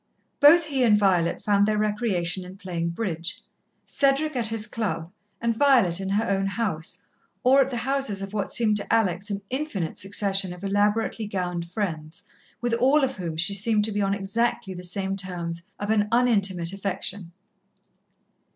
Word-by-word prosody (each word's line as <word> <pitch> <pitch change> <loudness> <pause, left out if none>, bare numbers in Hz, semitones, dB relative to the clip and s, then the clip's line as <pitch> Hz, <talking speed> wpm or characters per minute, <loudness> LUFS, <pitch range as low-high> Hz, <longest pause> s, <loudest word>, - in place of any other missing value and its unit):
Both 310 +4 +7
he 275 -4 -1
and 215 -3 +5
Violet 185 -5 +1
found 205 -1 +3
their 215 0 +1
recreation 205 -4 -1
in 185 +1 -11
playing 175 -4 -3
bridge, 170 -2 -4 0.5
Cedric 280 +2 +1
at 235 -3 0
his 225 -1 -2
club 200 -7 -3 0.3
and 230 -1 0
Violet 235 -10 +4
in 190 - -3
her 205 +3 +1
own 195 0 +1
house, 195 -6 -3 0.4
or 265 +2 +6
at 265 - +1
the 245 - -3
houses 265 -4 -1
of 195 +1 -7
what 205 -2 -2
seemed 215 -3 +2
to 205 - -4
Alex 195 -2 +1
an 200 -1 -4
infinite 255 - -3
succession 195 -1 +1
of 180 +2 -12
elaborately 210 +2 0
gowned 180 -3 -3
friends, 170 -3 -4 0.4
with 240 -1 -1
all 265 +5 +4
of 265 -2 -1
whom 170 -4 -4
she 180 +5 +2
seemed 210 +1 +1
to 220 - -2
be 205 0 -1
on 195 0 +1
exactly 200 0 -1
the 180 - -8
same 190 +2 -3
terms 175 -3 -4 0.2
of 205 +1 -2
an 210 -1 +2
unintimate 200 -8 +2
affection. 195 -2 -4
200 Hz, 170 wpm, -25 LUFS, 180-230 Hz, 0.5 s, Both